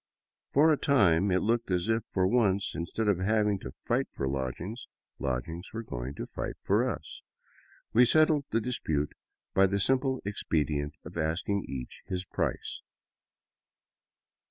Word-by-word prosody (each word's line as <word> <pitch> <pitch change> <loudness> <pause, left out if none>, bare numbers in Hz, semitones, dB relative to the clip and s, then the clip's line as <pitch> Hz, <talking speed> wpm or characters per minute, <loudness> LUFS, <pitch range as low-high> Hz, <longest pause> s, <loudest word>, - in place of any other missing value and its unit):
For 155 +3 +6
a - - +1
time 100 - +4
it 95 0 +2
looked 115 +1 +1
as 90 0 +1
if, 115 0 +2
for 95 -1 +2
once, 100 -2 +2
instead 95 +6 -2
of 100 -4 +3
having 105 0 +2
to 65 - -8
fight - - +1
for 70 - -3
lodgings, 70 - -4 0.3
lodgings 70 +8 -3
were 115 +1 -4
going 65 - -5
to - - -4
fight - - -5
for - - +3
us. - - -6 0.7
We 120 +3 +7
settled 155 -1 +4
the 115 - +1
dispute 80 -12 -1 0.4
by 95 0 +5
the 100 +1 0
simple 130 +5 +2
expedient 75 -7 -1
of - - -6
asking 85 +6 0
each 65 -2 -6
his 90 0 -3
price. - - -3
95 Hz, 150 wpm, -29 LUFS, 80-115 Hz, 0.7 s, We